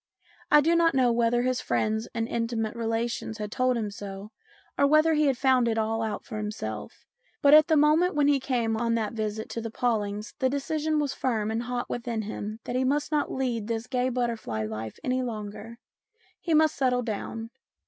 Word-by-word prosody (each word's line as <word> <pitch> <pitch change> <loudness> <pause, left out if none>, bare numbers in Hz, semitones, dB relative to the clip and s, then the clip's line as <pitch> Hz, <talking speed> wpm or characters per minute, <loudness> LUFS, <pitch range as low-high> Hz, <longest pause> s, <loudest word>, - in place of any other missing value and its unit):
I 295 - +7
do 330 +3 +3
not 335 -2 +3
know 255 -2 +4
whether 235 +1 +2
his 255 0 0
friends 220 +1 0
and 225 -1 -1
intimate 230 -1 -2
relations 230 -1 -2
had 210 -1 -5
told 255 +1 +1
him 215 -3 -2
so, 200 +1 -8 0.4
or 280 - +4
whether 310 +2 +4
he 305 -1 +3
had 270 -3 +1
found 260 -2 +3
it 225 -1 0
all 225 +1 0
out 220 -1 -3
for 220 - -6
himself, 210 - -6 0.4
but 285 0 +7
at 310 0 +8
the 315 -2 +3
moment 305 +4 +4
when 290 -1 +3
he 285 -1 +4
came 240 -4 0
on 230 +1 0
that 220 -1 -1
visit 220 -1 -3
to 230 - -4
the 225 - -4
Paw 235 0 +1
lings 205 +1 -5
the 260 -2 +2
decision 305 +3 -1
was 290 -2 0
firm 220 -4 -1
and 225 +1 -1
hot 245 0 -3
within 235 -2 -3
him 215 +1 -5
that 245 - -4
he 255 - +2
must 285 +4 0
not 300 -1 0
lead 240 -5 -2
this 230 0 -2
gay 250 0 0
butterfly 230 - -2
life 110 0 -6
any 255 0 0
longer. 225 -1 -6 0.6
He 330 -3 0
must 315 0 +4
settle 250 -2 +1
down. 225 +1 -5
235 Hz, 205 wpm, -27 LUFS, 220-265 Hz, 0.6 s, at